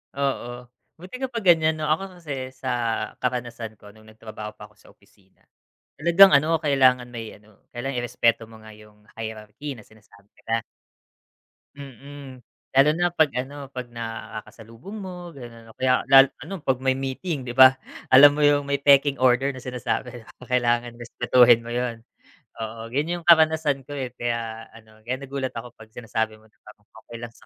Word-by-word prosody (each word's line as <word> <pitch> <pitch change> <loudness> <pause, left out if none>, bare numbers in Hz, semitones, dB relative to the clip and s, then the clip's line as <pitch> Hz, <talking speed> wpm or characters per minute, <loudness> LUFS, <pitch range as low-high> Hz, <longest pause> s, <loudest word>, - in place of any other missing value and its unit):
Oo, 125 -3 -3 0.3
buti 185 +9 -10
ka 265 - -2
pa 235 -4 -5
ganyan 160 -3 +4
'no? 155 - -6
Ako 185 +4 -2
kasi 135 -5 -6
sa 130 - -5 0.5
karanasan 120 -3 -4
ko 105 0 -16
nung 110 +1 -20
nagtrabaho 110 -1 -10
pa 105 0 -12
ako 105 - -27
sa - - -19
opisina 95 -1 -30 0.6
talagang 170 +5 +7
ano 155 +3 +3
kailangan 130 -4 +3
may 115 -2 -8
ano 105 0 -23 0.2
irespeto 120 -3 -1
mo 115 - -15
nga 110 - -12
yung 105 0 -18 0.2
hierarchy 110 +5 -7
na 110 - -14
sinasabi 105 -1 -22 0.2
ka. 115 0 0 1.1
Mm, 140 0 -11 0.4
lalo 135 +2 +6
na 175 +1 +1
pag 160 -3 +3
ano 140 +2 -5
pag 125 -1 -6
nakakasalubong 115 - -9
mo 180 -2 -8
gano'n 115 -4 -12
kaya 130 -1 +1 0.4
ano 185 0 -7
pag 135 -3 0
may 130 0 +1
meeting 135 +4 -4
'di 120 0 -7
ba 130 0 +9 0.4
alam 145 +2 +8
mo - - 0
yung 145 0 +3
may 140 - +1
taking 140 0 +4
order 130 +2 +3
na 135 - -6
sinasabi 125 -1 -4
di - - -18
ba 125 - -16
kailangan 120 -1 0
respetuhin 120 0 +4
mo 120 - -7
yun. 120 -2 -2 0.6
Oo 115 0 -6
yun 155 +7 -2
yung 165 - -19
karanasan 160 -4 +4
ko 145 - -10
eh, 135 -3 -4
kaya 115 -1 -4
ano 110 -1 -17
kaya 125 +3 -2
nagulat 135 -1 -4
ako 115 +1 -7
pag 110 0 -16
sinasabi 110 -2 -3
mo'ng 110 - -23 0.6
okay 120 - -9
lang 120 -1 -7
sa - - -21
125 Hz, 170 wpm, -24 LUFS, 115-145 Hz, 1.1 s, ba